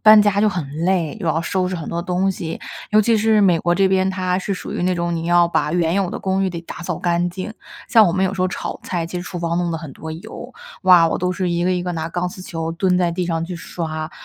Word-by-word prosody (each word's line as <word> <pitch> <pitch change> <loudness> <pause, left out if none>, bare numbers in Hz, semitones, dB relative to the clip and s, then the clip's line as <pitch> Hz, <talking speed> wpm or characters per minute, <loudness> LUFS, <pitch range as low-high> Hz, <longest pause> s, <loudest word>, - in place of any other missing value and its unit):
搬 215 0 +9
家 205 -1 +3
就 215 - +4
很 175 -6 -3 0.2
累， 180 -5 +1
又 170 - -1
要 160 +1 +1
收 180 +2 -1
拾 185 - -3
很 160 - -6
多 170 0 -2
东 185 +2 0
西， 165 -3 -5 0.3
尤 215 - +5
其 225 +2 +3
是 220 0 +3
美 180 -5 +4
国 175 - +1
这 195 +2 +3
边， 190 0 +2
它 185 -1 -1
是 195 +1 -2
属 185 - -5
于 - - -2
那 185 +1 +2
种 170 0 -1
你 165 0 -3
要 175 0 +5
把 150 -3 0
原 170 -1 +1
有 195 -2 +1
的 - - -4
公 190 0 0
寓 190 - 0
得 170 -1 -5
打 170 - -8
扫 175 -1 -3
干 175 0 0
净， 190 +4 -6 0.4
像 225 -4 +7
我 170 - +2
们 190 +1 +1
有 190 +1 -1
时 185 - -4
候 185 - +2
炒 - - -5
菜， 170 -3 -2
其 180 - -6
实 175 - -3
厨 180 0 -6
房 170 0 -1
弄 175 -1 0
了 165 - -2
很 150 -4 -8
多 160 - -8
油， 160 +2 -8 0.3
哇， 180 -3 +7
我 - - -1
都 180 0 -1
是 185 0 -1
一 170 0 0
个 185 - +2
一 180 -1 -1
个 180 - -2
拿 160 0 -3
钢 175 +1 -2
丝 185 +1 -10
球 165 -3 -4
蹲 180 +2 +1
在 175 -2 +1
地 180 +1 -1
上 165 -1 -1
去 180 +1 -6
刷。 160 -2 -5
180 Hz, 310 characters per minute, -20 LUFS, 170-190 Hz, 0.4 s, 搬